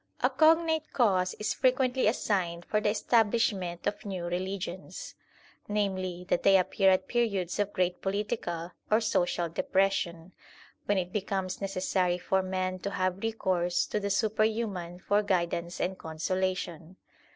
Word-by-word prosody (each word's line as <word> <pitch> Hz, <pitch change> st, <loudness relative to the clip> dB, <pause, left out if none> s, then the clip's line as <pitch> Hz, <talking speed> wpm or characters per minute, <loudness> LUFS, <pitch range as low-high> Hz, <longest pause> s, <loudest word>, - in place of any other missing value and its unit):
A -, -, +3 dB
cognate 320 Hz, 0 st, +3 dB
cause 185 Hz, -7 st, +2 dB
is 210 Hz, -, -1 dB
frequently 255 Hz, -1 st, +2 dB
assigned 180 Hz, -6 st, 0 dB
for 210 Hz, -, 0 dB
the 210 Hz, -, +2 dB
establish 225 Hz, +1 st, +3 dB
ment 175 Hz, -3 st, -6 dB
of 210 Hz, +1 st, -2 dB
new 190 Hz, -5 st, -4 dB
religions, 185 Hz, +1 st, -4 dB, 0.5 s
namely, 185 Hz, -4 st, -2 dB
that 175 Hz, -, +1 dB
they 195 Hz, -1 st, +6 dB
appear 190 Hz, +1 st, +3 dB
at 185 Hz, -1 st, +2 dB
periods 210 Hz, -7 st, 0 dB
of 205 Hz, 0 st, +1 dB
great 180 Hz, -2 st, 0 dB
political 195 Hz, -4 st, -2 dB, 0.2 s
or 215 Hz, -, +4 dB
social 175 Hz, -5 st, 0 dB
depression, 180 Hz, 0 st, 0 dB, 0.6 s
when 205 Hz, -, +2 dB
it 180 Hz, -1 st, -2 dB
becomes 195 Hz, -2 st, -2 dB
necessary 185 Hz, -2 st, 0 dB
for 190 Hz, +1 st, +1 dB
men 185 Hz, 0 st, -2 dB
to 200 Hz, -, -3 dB
have 185 Hz, -1 st, -1 dB
recourse 185 Hz, -6 st, 0 dB
to 210 Hz, -, -2 dB
the 200 Hz, 0 st, -2 dB
superhuman 215 Hz, -4 st, 0 dB
for 205 Hz, +3 st, +1 dB
INTRODUCTION -, -, +2 dB
xli 205 Hz, -, -11 dB
guidance 175 Hz, -2 st, -1 dB
and 185 Hz, +1 st, -1 dB
consolation. 175 Hz, +1 st, -3 dB
190 Hz, 150 wpm, -29 LUFS, 180-210 Hz, 0.6 s, they